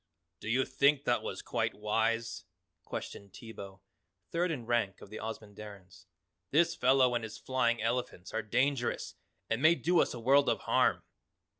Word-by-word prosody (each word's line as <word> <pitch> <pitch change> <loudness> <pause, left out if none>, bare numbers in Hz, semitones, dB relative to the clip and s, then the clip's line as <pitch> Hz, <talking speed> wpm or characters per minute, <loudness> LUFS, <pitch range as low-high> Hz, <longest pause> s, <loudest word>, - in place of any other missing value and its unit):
"Do 105 - -6
you 130 +3 +2
think 140 0 +3
that 120 - +1
was - - -5
quite - - -1
wise?" 115 +1 -1 0.4
questioned 100 -1 -7
Teebo, 100 -4 -10 0.5
third 175 +2 +1
in 135 -8 -4
rank 115 -5 0
of 100 - -13
the 110 - -6
Ozamandarins. 105 -4 -9 0.4
"This 165 +4 +3
fellow 130 -1 +4
and 120 -1 -1
his 110 -1 -7
flying 120 -3 0
elephant 115 -6 -2
are 110 - 0
dangerous 125 +4 0 0.3
and 115 +2 -1
may 160 +3 +6
do 175 +1 +2
us - - +1
a - - -6
world 135 +4 +4
of - - 0
harm." - - +2
115 Hz, 160 wpm, -31 LUFS, 105-130 Hz, 0.5 s, may